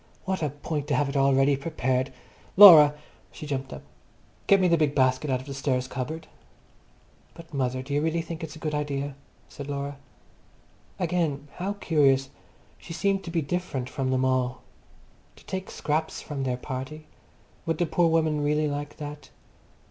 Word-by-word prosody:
What 190 Hz, -1 st, -2 dB
a 150 Hz, -, 0 dB
point 145 Hz, +1 st, -4 dB
to 145 Hz, -, +1 dB
have 140 Hz, +1 st, +1 dB
it 140 Hz, -, -6 dB
all 135 Hz, -1 st, +4 dB
ready 135 Hz, +1 st, +4 dB
prepared. 130 Hz, -3 st, -1 dB, 0.5 s
Laura!" 155 Hz, -7 st, +10 dB, 0.4 s
She -, -, -9 dB
jumped 135 Hz, -2 st, -4 dB
up. -, -, -8 dB, 0.6 s
"Get 200 Hz, -, +6 dB
me 185 Hz, -, +3 dB
the 170 Hz, -, +4 dB
big 150 Hz, -3 st, +1 dB
basket 130 Hz, +2 st, +2 dB
out 130 Hz, -1 st, 0 dB
of -, -, -13 dB
the 140 Hz, -, -6 dB
stairs 130 Hz, -2 st, -1 dB
cupboard." 155 Hz, +5 st, -5 dB, 1.1 s
"But, 165 Hz, -2 st, -13 dB
mother, 130 Hz, -2 st, -1 dB
do 140 Hz, +2 st, -6 dB
you 145 Hz, -, +2 dB
really 165 Hz, +1 st, 0 dB
think 165 Hz, 0 st, -7 dB
it's 160 Hz, -1 st, -6 dB
a 160 Hz, -, -13 dB
good 155 Hz, -, -1 dB
idea?" 145 Hz, -1 st, -2 dB, 0.3 s
said 140 Hz, -, -9 dB
Laura. 140 Hz, 0 st, -4 dB, 1.0 s
Again, 160 Hz, -5 st, -1 dB
how 195 Hz, +3 st, -2 dB
curious, 140 Hz, -8 st, +2 dB, 0.5 s
she -, -, -9 dB
seemed 195 Hz, +2 st, 0 dB
to -, -, -5 dB
be 165 Hz, -2 st, -1 dB
different 140 Hz, -5 st, -3 dB
from 135 Hz, -1 st, -2 dB
them 130 Hz, 0 st, +1 dB
all. 130 Hz, -1 st, 0 dB, 0.7 s
To -, -, -19 dB
take 190 Hz, 0 st, -5 dB
scraps 155 Hz, +1 st, -2 dB
from 140 Hz, -3 st, -5 dB
their 125 Hz, -1 st, -1 dB
party. 135 Hz, +4 st, -6 dB, 0.6 s
Would 165 Hz, -1 st, 0 dB
the 175 Hz, -, +1 dB
poor 170 Hz, +1 st, +2 dB
woman 160 Hz, -2 st, +1 dB
really 150 Hz, +1 st, +1 dB
like 145 Hz, 0 st, -5 dB
that? 150 Hz, 0 st, -8 dB
145 Hz, 180 wpm, -26 LUFS, 135-160 Hz, 1.1 s, Laura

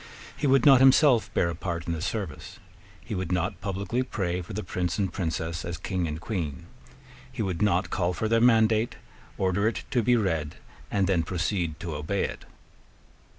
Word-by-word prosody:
He 145 Hz, -, -1 dB
would 135 Hz, -2 st, +4 dB
not 135 Hz, -3 st, +8 dB
himself 135 Hz, -2 st, +5 dB
bear 85 Hz, -, +2 dB
a -, -, -4 dB
part 85 Hz, -1 st, -4 dB
in 85 Hz, -, -2 dB
the 80 Hz, -, -4 dB
service. -, -, -4 dB, 0.4 s
He 115 Hz, -, -7 dB
would 95 Hz, -3 st, -3 dB
not 90 Hz, +3 st, -1 dB
publicly 100 Hz, +4 st, -2 dB
pray 90 Hz, -8 st, -2 dB
for 85 Hz, -, -10 dB
the 105 Hz, -, -3 dB
Prince 90 Hz, 0 st, -2 dB
and 100 Hz, -2 st, -1 dB
Princess 80 Hz, -2 st, -3 dB
as 85 Hz, 0 st, -4 dB
King 90 Hz, -1 st, -2 dB
and 75 Hz, 0 st, -4 dB
Queen. 85 Hz, -7 st, -4 dB, 0.7 s
He 125 Hz, -3 st, -3 dB
would 90 Hz, -4 st, -3 dB
not 95 Hz, -2 st, +2 dB
call 90 Hz, -1 st, 0 dB
for 90 Hz, +5 st, -2 dB
their 115 Hz, +1 st, +3 dB
mandate, 115 Hz, -1 st, +4 dB, 0.4 s
order 95 Hz, +2 st, +1 dB
it 115 Hz, -, -2 dB
to 125 Hz, -, +2 dB
be 125 Hz, +2 st, +3 dB
read, 80 Hz, -8 st, -1 dB, 0.3 s
and 100 Hz, -2 st, +1 dB
then 95 Hz, -3 st, +2 dB
proceed 85 Hz, -2 st, -2 dB
to 85 Hz, -, -4 dB
obey 75 Hz, +7 st, -2 dB
it. -, -, -5 dB
95 Hz, 190 wpm, -27 LUFS, 85-110 Hz, 0.7 s, not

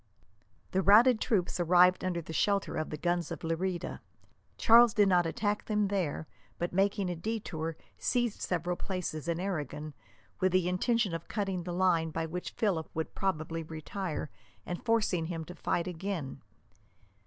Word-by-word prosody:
The 190 Hz, -, +2 dB
routed 220 Hz, +5 st, +6 dB
troops 185 Hz, -7 st, 0 dB
arrived 180 Hz, +1 st, +5 dB
under 175 Hz, -2 st, -1 dB
the 160 Hz, -, -8 dB
shelter 200 Hz, +4 st, +1 dB
of 155 Hz, -, -2 dB
the 150 Hz, -, -4 dB
guns 175 Hz, +2 st, 0 dB
of -, -, -6 dB
Lerida. 175 Hz, +2 st, -2 dB, 0.6 s
Charles 235 Hz, 0 st, +6 dB
did 205 Hz, -2 st, +5 dB
not 175 Hz, -3 st, +4 dB
attack 205 Hz, +4 st, -1 dB
them 210 Hz, -2 st, +1 dB
there, 180 Hz, -6 st, -1 dB, 0.3 s
but, 175 Hz, 0 st, -3 dB
making 195 Hz, +1 st, +2 dB
a -, -, -3 dB
detour, 165 Hz, -5 st, -4 dB, 0.2 s
seized 240 Hz, -3 st, 0 dB
several 175 Hz, 0 st, -1 dB
places 175 Hz, -5 st, -4 dB
in 170 Hz, 0 st, 0 dB
Aragon, 155 Hz, -5 st, -4 dB, 0.5 s
with 185 Hz, -2 st, +2 dB
the 185 Hz, -1 st, +3 dB
intention 205 Hz, +2 st, +1 dB
of 165 Hz, 0 st, -5 dB
cutting 195 Hz, -4 st, -2 dB
the 180 Hz, -, -4 dB
line 175 Hz, -2 st, +2 dB
by 160 Hz, +1 st, -2 dB
which 180 Hz, +3 st, -5 dB
Philip 185 Hz, -8 st, 0 dB
would 160 Hz, 0 st, -3 dB
probably 165 Hz, -3 st, -2 dB
retire, 160 Hz, 0 st, -5 dB, 0.3 s
and 175 Hz, -, -5 dB
forcing 215 Hz, -8 st, +1 dB
him 165 Hz, -2 st, -4 dB
to 180 Hz, -, -9 dB
fight 170 Hz, 0 st, -1 dB
again. 180 Hz, -4 st, -4 dB
180 Hz, 160 wpm, -31 LUFS, 165-200 Hz, 0.6 s, routed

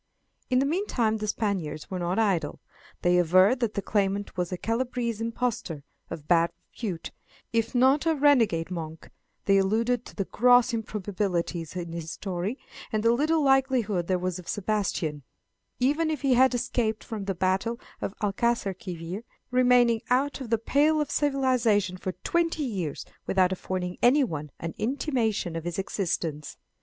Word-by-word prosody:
In 255 Hz, -, +3 dB
the 265 Hz, -, +3 dB
meantime 275 Hz, -, 0 dB
the 215 Hz, 0 st, -4 dB
Spaniards 190 Hz, -9 st, -2 dB
were 185 Hz, -, -2 dB
not 175 Hz, +1 st, -1 dB
idle. 200 Hz, -7 st, +1 dB, 0.4 s
They 180 Hz, 0 st, +4 dB
averred 185 Hz, +8 st, +5 dB
that 235 Hz, -4 st, -1 dB
the 200 Hz, -, -2 dB
claimant 200 Hz, -1 st, -1 dB
was 180 Hz, -1 st, -2 dB
a 180 Hz, -, -2 dB
Calabrese 235 Hz, 0 st, -2 dB
impostor, 230 Hz, -, -2 dB, 0.3 s
of 155 Hz, -3 st, -7 dB
bad 170 Hz, -1 st, +4 dB, 0.2 s
repute, 190 Hz, -8 st, -5 dB, 0.4 s
if 230 Hz, +1 st, 0 dB
not 265 Hz, +5 st, +4 dB
a 325 Hz, -, +3 dB
renegade 235 Hz, -, +3 dB
monk; 160 Hz, -2 st, -6 dB, 0.3 s
they 195 Hz, 0 st, +5 dB
alluded 225 Hz, +5 st, +1 dB
to -, -, -13 dB
the 195 Hz, -, -2 dB
gross 245 Hz, +3 st, +4 dB
improbabilities 190 Hz, -6 st, -2 dB
in 170 Hz, -2 st, -4 dB
his 165 Hz, -1 st, -5 dB
story, 190 Hz, +6 st, -3 dB, 0.3 s
and 215 Hz, -1 st, 0 dB
the 230 Hz, 0 st, +5 dB
little 305 Hz, +5 st, +2 dB
likelihood 260 Hz, -10 st, +2 dB
there 185 Hz, -, +2 dB
was 180 Hz, 0 st, -3 dB
of 175 Hz, -, -12 dB
Sebastian, 190 Hz, -7 st, -1 dB, 0.6 s
even 295 Hz, +6 st, +2 dB
if 305 Hz, -3 st, -3 dB
he 270 Hz, -2 st, +4 dB
had 255 Hz, +1 st, +5 dB
escaped 235 Hz, -2 st, -1 dB
from 215 Hz, -3 st, -5 dB
the 195 Hz, -1 st, -2 dB
battle 190 Hz, +6 st, 0 dB, 0.2 s
of 195 Hz, -, -4 dB
Alcaçarquivir, 195 Hz, -4 st, -2 dB, 0.3 s
remaining 245 Hz, -2 st, +4 dB
out 270 Hz, +3 st, +1 dB
of 250 Hz, -, -6 dB
the 230 Hz, -, +3 dB
pale 295 Hz, +7 st, +2 dB
of 300 Hz, -, -1 dB
civilization 250 Hz, -9 st, +2 dB
for 185 Hz, 0 st, -4 dB
twenty 335 Hz, -2 st, +1 dB
years 190 Hz, -, -3 dB, 0.2 s
without 185 Hz, -1 st, +3 dB
affording 180 Hz, -1 st, -3 dB
anyone 240 Hz, -, +2 dB
an 165 Hz, 0 st, -4 dB
intimation 225 Hz, -, -1 dB
of 165 Hz, -, -4 dB
his 175 Hz, 0 st, -3 dB
existence. 170 Hz, -6 st, -3 dB
210 Hz, 155 wpm, -27 LUFS, 180-250 Hz, 0.6 s, averred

